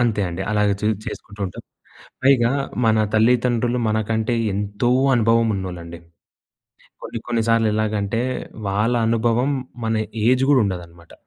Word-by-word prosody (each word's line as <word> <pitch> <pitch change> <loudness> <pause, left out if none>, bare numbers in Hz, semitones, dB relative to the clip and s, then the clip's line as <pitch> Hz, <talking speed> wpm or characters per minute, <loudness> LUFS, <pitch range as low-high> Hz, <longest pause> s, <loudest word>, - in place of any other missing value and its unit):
అంతే 115 -4 +1
అండి. 85 +2 -4
అలాగే 105 -1 +2
చూస్ 105 -1 0
చేసుకుంటూ 100 -1 -8
ఉంటా. 90 - -10 0.7
పైగా 125 -3 +4 0.3
మన 110 0 +4 0.2
తల్లిదండ్రులు 120 +1 +2
మనకంటే 110 +2 0 0.2
ఎంతో 100 +4 -1 0.3
అనుభవం 115 0 +3
ఉన్నోళ్లండి. 85 -3 -6 1.0
కొన్ని, 115 - -5
కొన్ని 115 -2 +1
సార్లు 115 -1 +3
ఎలాగంటే 110 0 -1 0.5
వాళ్ళ 105 +5 +1
అనుభవం 115 +3 +1 0.3
మన 110 0 0 0.3
ఏజ్ 130 +2 +4
గూడా 135 -3 +5
ఉండదన్నమాట. 85 -3 -6
110 Hz, 125 wpm, -21 LUFS, 100-120 Hz, 1.0 s, గూడా